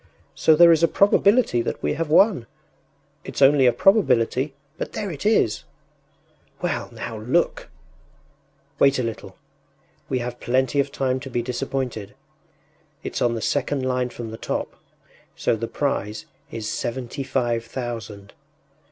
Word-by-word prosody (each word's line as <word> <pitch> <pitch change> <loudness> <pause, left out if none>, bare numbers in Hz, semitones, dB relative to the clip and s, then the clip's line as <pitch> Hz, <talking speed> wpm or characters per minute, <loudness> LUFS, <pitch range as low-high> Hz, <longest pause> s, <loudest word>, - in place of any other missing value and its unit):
“So 160 - +4
there 170 +2 +8
is 165 -1 +4
a 165 - +5
probability 200 - +3
that - - -4
we - - +1
have 160 0 -3
won. 175 - +4 0.8
It’s - - -6
only 135 -1 +6
a - - +6
probability, 130 - +2 0.2
but - - -4
there 205 -3 -3
it 155 +5 -3
is!” 115 - +2 1.0
“Well, 175 - -2
now 115 -1 -6
look!” 125 +11 0 1.1
“Wait 140 0 +4
a 130 - 0
little. 110 -4 -6 0.7
We 130 - 0
have 120 0 -5
plenty 130 +3 +1
of 140 0 +1
time 130 -1 -1
to 135 +1 -8
be 120 -1 -2
disappointed. 125 -3 -4 0.9
It’s - - -4
on 120 -1 +2
the 115 - -4
second 140 +1 -1
line 125 -1 0
from 120 -2 -7
the 110 - -7
top, - - -3 0.6
so - - +1
the 115 +1 -4
prize 110 -7 -2 0.2
is 110 -2 -5
seventy 125 +4 -4
five 120 -3 -1
thousand. 115 -4 -7
130 Hz, 145 wpm, -23 LUFS, 115-145 Hz, 1.1 s, there